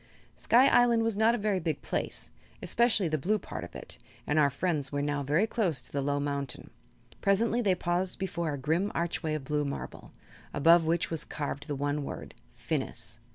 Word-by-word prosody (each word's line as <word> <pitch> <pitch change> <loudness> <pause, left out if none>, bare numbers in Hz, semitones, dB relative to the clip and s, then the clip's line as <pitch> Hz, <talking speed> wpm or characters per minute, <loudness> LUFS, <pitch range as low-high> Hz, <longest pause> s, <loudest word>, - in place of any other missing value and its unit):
Sky 250 +4 +5
Island 240 -3 +5
was 225 -2 +1
not 220 +3 +4
a - - -1
very 205 -3 0
big 160 -4 -3
place, - - -3 0.3
especially 230 -5 +3
the 155 -1 0
blue 210 +9 +1
part - - -7
of - - -10
it, - - -7 0.3
and 150 +1 +2
our 145 -2 +5
friends 145 -1 -1
were 145 0 -1
now 145 0 -1
very 150 +9 +2
close 195 - 0
to - - -12
the 140 - -1
low 145 +1 0
mountain. 140 -2 -3 0.5
Presently 225 +4 +2
they 195 -5 +3
paused 180 +1 -1
before 170 -4 -2
a 145 - -3
grim 160 +9 0
archway 165 -2 -1
of 150 - -4
blue 150 +2 0
marble, 140 -1 -6 0.4
above 165 +3 +6
which 170 +1 +1
was 165 - -1
carved 145 -1 -4
the 145 - -2
one 145 +1 -1
word: - - -7 0.2
"Phinis." - - -4
165 Hz, 195 wpm, -29 LUFS, 145-200 Hz, 0.5 s, above